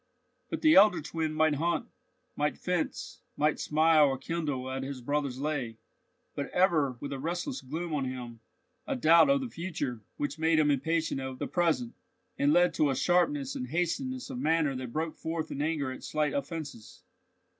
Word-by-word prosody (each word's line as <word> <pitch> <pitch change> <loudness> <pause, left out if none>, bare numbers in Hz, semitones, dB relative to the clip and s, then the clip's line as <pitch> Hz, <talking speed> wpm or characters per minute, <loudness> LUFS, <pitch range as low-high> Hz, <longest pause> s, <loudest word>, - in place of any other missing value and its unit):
But - - -4
the 315 0 +7
elder 210 - +7
twin 160 +1 -3
might 155 0 +2
hunt, 165 +4 0 0.5
might - - 0
fence, - - -3 0.2
might 150 0 +1
smile 155 0 +4
or 135 -1 -1
kindle 145 -3 -3
at 135 0 -3
his 135 0 -5
brother's 140 0 -2
lay, 135 -6 -2 0.6
but 140 - -4
ever 155 -9 +2
with 140 +2 -5
a 135 - -5
restless 175 - -3
gloom 160 +5 -5
on 140 -3 0
him, 125 -3 -6 0.5
a 280 - -1
doubt 170 - +6
of 275 0 +3
the 260 - -3
future 165 - -4 0.2
which 145 +2 -3
made 160 0 +3
him 150 -1 +4
impatient 160 0 0
of 130 -1 -5
the - - -3
present, 160 -9 0 0.4
and 140 +1 +2
led 175 +1 +4
to 150 -2 +2
a 135 - 0
sharpness 145 -5 +1
and 125 - -4
hastiness 250 - -2
of 255 - -5
manner 160 - +1
that 125 -2 -5
broke 160 +4 -2
forth 160 0 -4
in 140 - -3
anger 150 -3 -1
at 130 - -9
slight 150 -2 -1
offences. 140 -5 -6
155 Hz, 180 wpm, -29 LUFS, 135-165 Hz, 0.6 s, the